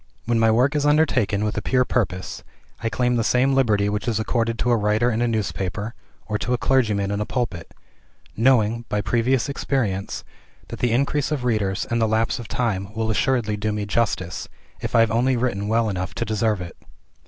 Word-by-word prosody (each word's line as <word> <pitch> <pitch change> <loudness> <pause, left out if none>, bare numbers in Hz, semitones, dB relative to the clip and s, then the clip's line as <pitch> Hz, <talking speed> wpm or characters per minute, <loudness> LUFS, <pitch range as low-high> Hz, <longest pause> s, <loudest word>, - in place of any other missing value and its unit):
When 115 0 +1
my 115 0 +4
work 125 +7 +3
is 145 - +1
undertaken 140 -9 +2
with 105 - -2
a - - -5
pure 125 +3 +2
purpose, 95 -7 -2 0.4
I 115 - 0
claim 125 +1 +1
the 115 - +1
same 125 +4 +2
liberty 110 -7 +2
which 105 +2 -2
is 110 -3 +1
accorded 115 +1 0
to 120 - +1
a - - +5
writer 110 +3 +2
in 115 +1 -1
a 120 - +2
newspaper, 105 -1 -2 0.3
or 105 -1 -2
to 125 - -1
a - - -2
clergyman 105 -5 +1
in 100 +1 -1
a - - -1
pulpit; 115 -10 -3 0.6
knowing, 115 -1 +3
by 105 - 0
previous 120 +3 +1
experience, 120 -8 -2 0.5
that - - -7
the 125 - +1
increase 140 +4 +1
of 145 -5 -1
readers 105 -5 0
and 115 0 +1
the 110 - +3
lapse 110 +3 0
of 120 - -7
time 100 -5 -2
will 110 0 0
assuredly 110 -1 +1
do 105 +1 -1
me 105 -1 -2
justice, 100 -4 -1 0.3
if - - -4
I 115 - +7
have 115 -1 +3
only 125 +3 +2
written 110 -5 -1
well 115 +1 +2
enough 95 -2 -3
to 120 - -2
deserve 110 -2 0
it. 85 - -8
115 Hz, 205 wpm, -23 LUFS, 105-125 Hz, 0.6 s, I